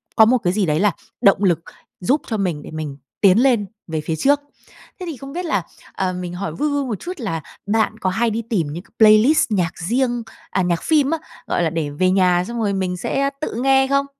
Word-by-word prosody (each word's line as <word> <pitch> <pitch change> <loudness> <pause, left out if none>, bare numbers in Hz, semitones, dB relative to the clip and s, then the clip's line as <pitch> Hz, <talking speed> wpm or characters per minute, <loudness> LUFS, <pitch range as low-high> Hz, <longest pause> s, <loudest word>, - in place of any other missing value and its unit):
có 220 - +7
một 250 +3 +4
cái 180 -5 0
gì 205 -1 +1
đấy 155 -1 +1
là 205 +2 +3 0.3
động 195 0 +4
lực 175 -4 +3 0.4
giúp 260 +11 +1
cho 220 - -2
mình 175 -7 -1
để - - -10
mình 155 -3 -5 0.2
tiến 195 0 +6
lên 245 -6 +3 0.2
về 160 -1 -2
phía 160 +1 -2
trước. 280 - +3 0.6
Thế 365 - -5
thì 300 - -6
không 275 +3 -9
biết 355 +1 -3
là, 205 - 0 0.3
ờ, 185 -1 -1
mình 180 -1 -5
hỏi 195 +3 -4
vui 300 +2 -1
vui 285 -1 0
một 220 -6 -3
chút 360 - -5
là 165 -9 -3 0.3
bạn 220 +1 +1
có 185 - 0
hay 230 +5 +1
đi 225 +1 -2
tìm 180 -9 +1
những 175 +3 -6
cái - - -26
playlist 220 +6 +6
nhạc 180 -5 +1
riêng 240 +6 0 0.3
à, 190 - 0
nhạc 175 -2 0
phim 295 -3 +3
á, 325 - +1 0.3
gọi - - 0
là 165 - +2
để 160 -3 -2
về 185 +6 +1
nhà 180 -2 +3
xong 235 0 -4
rồi 205 -3 0
mình 185 -2 -1
sẽ 275 +9 0
tự 305 - -3
nghe 270 0 +4
không? 275 0 +2
205 Hz, 240 wpm, -20 LUFS, 180-255 Hz, 0.6 s, có